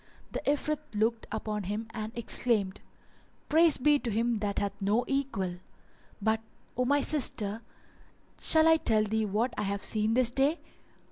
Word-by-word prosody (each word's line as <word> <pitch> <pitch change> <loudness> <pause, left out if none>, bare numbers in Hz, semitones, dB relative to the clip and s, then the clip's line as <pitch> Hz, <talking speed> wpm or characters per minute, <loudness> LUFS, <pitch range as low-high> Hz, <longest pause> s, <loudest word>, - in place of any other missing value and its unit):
The - - -3
Ifrit 295 +1 -1 0.2
looked 225 +2 -1
upon 210 -2 -4
him 210 +4 -4
and 220 -1 -6
exclaimed, 220 -4 0 0.7
"Praise 320 0 +4
be 290 +2 +3
to 245 - -4
Him 230 +1 0
that 200 -1 -3
hath 200 -1 -1
no 210 +5 +1
equal! 230 -10 -2 0.6
But, 220 +1 0 0.3
O 250 - 0
my 285 +2 +2
sister, 225 -8 +3 0.8
shall 315 0 +4
I 325 0 +6
tell 220 -8 +1
thee 215 0 -1
what 225 +5 -1
I - - 0
have 200 -1 -3
seen 215 +1 +1
this 250 -1 +4
day?" 280 +6 +1
225 Hz, 155 wpm, -29 LUFS, 210-270 Hz, 0.8 s, I